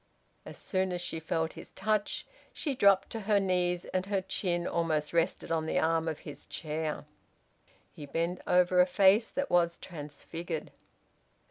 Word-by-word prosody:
As -, -, -9 dB
soon 190 Hz, -2 st, -1 dB
as 180 Hz, -, -2 dB
she 175 Hz, -2 st, -3 dB
felt 160 Hz, 0 st, -1 dB
his -, -, -10 dB
touch, 215 Hz, +1 st, -1 dB, 0.3 s
she 290 Hz, -, -2 dB
dropped 200 Hz, -5 st, +4 dB
to 225 Hz, -, -3 dB
her 210 Hz, -1 st, +2 dB
knees, 180 Hz, -2 st, 0 dB
and 185 Hz, 0 st, -2 dB
her 195 Hz, -2 st, 0 dB
chin 175 Hz, -2 st, -1 dB
almost 160 Hz, -3 st, 0 dB
rested 170 Hz, 0 st, 0 dB
on 160 Hz, -1 st, 0 dB
the -, -, 0 dB
arm 165 Hz, 0 st, +2 dB
of 160 Hz, -2 st, -2 dB
his 145 Hz, -, -9 dB
chair. 155 Hz, -1 st, -3 dB, 0.9 s
He 145 Hz, -, -10 dB
bent 170 Hz, +5 st, -2 dB
over 180 Hz, 0 st, +5 dB
a 180 Hz, -, +4 dB
face 200 Hz, +4 st, +5 dB
that 280 Hz, -, -3 dB
was 170 Hz, -1 st, +3 dB
transfigured. 160 Hz, +1 st, -6 dB
175 Hz, 160 wpm, -30 LUFS, 160-190 Hz, 0.9 s, over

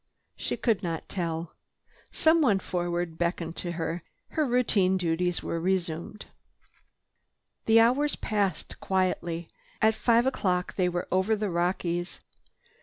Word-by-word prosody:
She -, -, -3 dB
could 225 Hz, -6 st, +1 dB
not 165 Hz, -2 st, -4 dB
tell. 165 Hz, -3 st, -3 dB, 0.6 s
Someone 315 Hz, -10 st, +4 dB
forward 175 Hz, -2 st, -3 dB
beckoned 170 Hz, -1 st, -1 dB
to 175 Hz, -1 st, -4 dB
her. 165 Hz, +1 st, -3 dB, 0.3 s
Routine 240 Hz, -10 st, +2 dB
duties 175 Hz, 0 st, 0 dB
were 170 Hz, -, -2 dB
resumed. 180 Hz, +2 st, -2 dB, 1.4 s
The 225 Hz, 0 st, +7 dB
hours 275 Hz, +6 st, +3 dB
passed 205 Hz, -3 st, -2 dB
quietly. 175 Hz, -3 st, -1 dB, 0.3 s
At 220 Hz, 0 st, +4 dB
five 235 Hz, +2 st, +3 dB
o'clock 180 Hz, -9 st, 0 dB
they 180 Hz, -2 st, +2 dB
were 175 Hz, 0 st, -3 dB
over 190 Hz, +4 st, +2 dB
the 210 Hz, -2 st, -2 dB
Rockies. 175 Hz, 0 st, -1 dB
180 Hz, 115 wpm, -28 LUFS, 170-215 Hz, 1.4 s, The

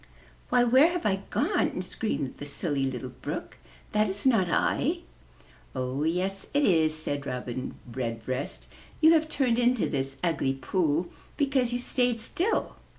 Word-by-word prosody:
"Why, 245 Hz, -1 st, +4 dB
where 260 Hz, +8 st, +5 dB
have 355 Hz, -, -3 dB
I 195 Hz, -2 st, +3 dB
gone?" -, -, +1 dB
screamed 165 Hz, -, -3 dB
the 145 Hz, -, -7 dB
Silly 140 Hz, -1 st, -1 dB
Little 130 Hz, 0 st, -5 dB
Brook. 150 Hz, +4 st, -5 dB, 0.3 s
"That 210 Hz, -1 st, +2 dB
is 195 Hz, +4 st, -4 dB
not 220 Hz, -9 st, +4 dB
I!" 330 Hz, -, +1 dB, 0.7 s
"Oh, 130 Hz, +2 st, -2 dB
yes 185 Hz, +4 st, -1 dB
it 290 Hz, -, +4 dB
is," 160 Hz, -, +4 dB
said 145 Hz, -2 st, -3 dB
Robin 125 Hz, 0 st, -4 dB
Redbreast. 125 Hz, +2 st, -4 dB, 0.3 s
"You 320 Hz, +1 st, +7 dB
have 315 Hz, -1 st, +2 dB
turned 250 Hz, -6 st, +1 dB
into 245 Hz, -2 st, +3 dB
this 135 Hz, -2 st, -2 dB
ugly 150 Hz, -6 st, +1 dB
pool 160 Hz, +4 st, 0 dB, 0.3 s
because 270 Hz, -4 st, +2 dB
you 245 Hz, -, 0 dB
stayed 245 Hz, -1 st, 0 dB
still. 355 Hz, -, -1 dB
180 Hz, 150 wpm, -28 LUFS, -, 0.7 s, You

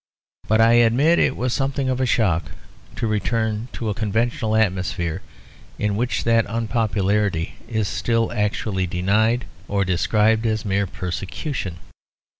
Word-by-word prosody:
But 110 Hz, +1 st, +3 dB
I 115 Hz, +1 st, +6 dB
admit 135 Hz, +9 st, +4 dB
it -, -, +2 dB
was 125 Hz, 0 st, -1 dB
something 135 Hz, -1 st, -1 dB
of 130 Hz, 0 st, 0 dB
a 130 Hz, -, +1 dB
shock 85 Hz, -9 st, +1 dB, 0.5 s
to -, -, -2 dB
return 110 Hz, +1 st, -1 dB
to 115 Hz, -, -4 dB
a 105 Hz, -, 0 dB
conventional 110 Hz, +1 st, -1 dB
atmosphere, 90 Hz, -5 st, 0 dB, 0.6 s
in 105 Hz, -1 st, 0 dB
which 120 Hz, +3 st, -1 dB
that 115 Hz, -1 st, +3 dB
unpopularity 105 Hz, -5 st, 0 dB
is 110 Hz, -3 st, -1 dB
still 115 Hz, +1 st, 0 dB
actually 105 Hz, -3 st, -1 dB
denied 105 Hz, +7 st, +1 dB, 0.2 s
or 100 Hz, -1 st, 0 dB
described 110 Hz, +5 st, +2 dB
as 110 Hz, 0 st, -1 dB
mere 100 Hz, 0 st, 0 dB
persecution. 95 Hz, -, -4 dB
110 Hz, 135 wpm, -22 LUFS, 100-115 Hz, 0.6 s, I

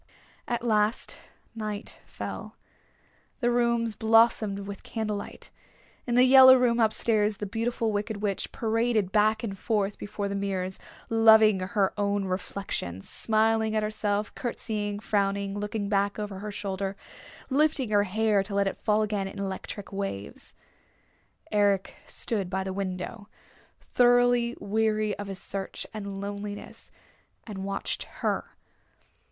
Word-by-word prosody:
At 240 Hz, -1 st, -2 dB
last 215 Hz, -1 st, +1 dB, 0.4 s
night 215 Hz, -2 st, -5 dB
fell. -, -, -7 dB, 0.8 s
The 240 Hz, -2 st, +2 dB
rooms 235 Hz, -1 st, +1 dB
blossomed 220 Hz, -2 st, +3 dB
with 200 Hz, 0 st, -7 dB
candlelight. 210 Hz, -3 st, -5 dB, 0.6 s
In 240 Hz, -, 0 dB
the 250 Hz, -, +7 dB
yellow 260 Hz, 0 st, +9 dB
room 245 Hz, -2 st, +2 dB
up 220 Hz, -2 st, +4 dB
stairs 215 Hz, -2 st, +1 dB
the 210 Hz, -, -4 dB
Beautiful 225 Hz, +2 st, -1 dB
Wicked 210 Hz, +1 st, -2 dB
Witch 205 Hz, -2 st, -2 dB
paraded 225 Hz, -3 st, 0 dB
back 215 Hz, +1 st, +3 dB
and 200 Hz, -4 st, -3 dB
forth 205 Hz, 0 st, -1 dB
before 205 Hz, 0 st, -4 dB
the 200 Hz, -, -3 dB
mirrors, 190 Hz, -2 st, -2 dB, 0.3 s
loving 220 Hz, -2 st, +6 dB
her 195 Hz, +1 st, 0 dB
own 200 Hz, -1 st, +1 dB
reflection, 185 Hz, -, -4 dB
smiling 220 Hz, -, +1 dB
at 215 Hz, -, +1 dB
herself, 210 Hz, -1 st, -1 dB
courtesying, 210 Hz, -4 st, -3 dB
frowning, 200 Hz, -1 st, 0 dB
looking 205 Hz, 0 st, -3 dB
back 200 Hz, 0 st, +1 dB
over 205 Hz, -2 st, -5 dB
her 210 Hz, +1 st, -5 dB
shoulder, 195 Hz, -1 st, -3 dB, 0.6 s
lifting 285 Hz, -4 st, +2 dB
her 205 Hz, -1 st, +4 dB
hair 210 Hz, +1 st, +2 dB
to 200 Hz, +1 st, -5 dB
let 200 Hz, 0 st, +3 dB
it 195 Hz, -, -3 dB
fall 215 Hz, 0 st, +2 dB
again 205 Hz, -2 st, -1 dB
in -, -, -9 dB
electric 195 Hz, +1 st, -5 dB
waves. 195 Hz, -, -5 dB, 1.0 s
Eric 200 Hz, -2 st, +2 dB
stood 200 Hz, -6 st, -1 dB
by 190 Hz, +1 st, -1 dB
the 190 Hz, 0 st, -4 dB
window, 195 Hz, +2 st, -5 dB, 0.5 s
thoroughly 245 Hz, -1 st, +3 dB
weary 215 Hz, 0 st, 0 dB
of 205 Hz, -, -5 dB
his 195 Hz, -1 st, -5 dB
search 195 Hz, 0 st, -4 dB
and 200 Hz, -2 st, -5 dB
loneliness, 205 Hz, +1 st, -7 dB, 0.6 s
and 210 Hz, -4 st, -7 dB
watched 195 Hz, +1 st, -3 dB, 0.2 s
her. -, -, -1 dB
210 Hz, 135 wpm, -27 LUFS, 200-225 Hz, 1.0 s, yellow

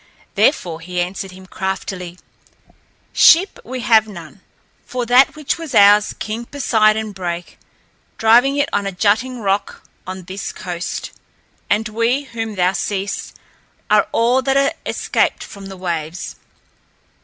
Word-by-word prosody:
Therefore 170 Hz, -, +1 dB
he 180 Hz, +1 st, -4 dB
answered 190 Hz, +2 st, -3 dB
him 185 Hz, 0 st, -13 dB
craftily: 190 Hz, -2 st, -5 dB, 1.0 s
"Ship 360 Hz, +4 st, +5 dB
have 235 Hz, -3 st, +2 dB
we -, -, -10 dB
none, 170 Hz, 0 st, -11 dB, 0.4 s
for 250 Hz, -1 st, -4 dB
that 250 Hz, +5 st, +5 dB
which 305 Hz, +2 st, -2 dB
was 315 Hz, -7 st, -6 dB
ours 205 Hz, 0 st, +6 dB
King 220 Hz, +3 st, -4 dB
Poseidon 220 Hz, -5 st, +1 dB
brake, 175 Hz, -2 st, -6 dB, 0.6 s
driving 245 Hz, +5 st, +4 dB
it 285 Hz, -, +2 dB
on 200 Hz, -1 st, 0 dB
a -, -, -2 dB
jutting 220 Hz, +6 st, 0 dB
rock 200 Hz, 0 st, -1 dB, 0.2 s
on 185 Hz, 0 st, -6 dB
this 190 Hz, +3 st, -6 dB
coast, 175 Hz, -1 st, -5 dB, 0.6 s
and 215 Hz, +2 st, +1 dB
we 230 Hz, +6 st, 0 dB
whom 225 Hz, -5 st, -5 dB
thou 180 Hz, 0 st, +2 dB
seest 195 Hz, +1 st, -3 dB, 0.6 s
are -, -, +4 dB
all 240 Hz, +3 st, +2 dB
that 270 Hz, +1 st, +1 dB
are 275 Hz, 0 st, +2 dB
escaped -, -, 0 dB
from 200 Hz, -2 st, -10 dB
the 195 Hz, -1 st, -9 dB
waves." 170 Hz, -2 st, -4 dB
205 Hz, 135 wpm, -19 LUFS, 185-240 Hz, 1.0 s, ours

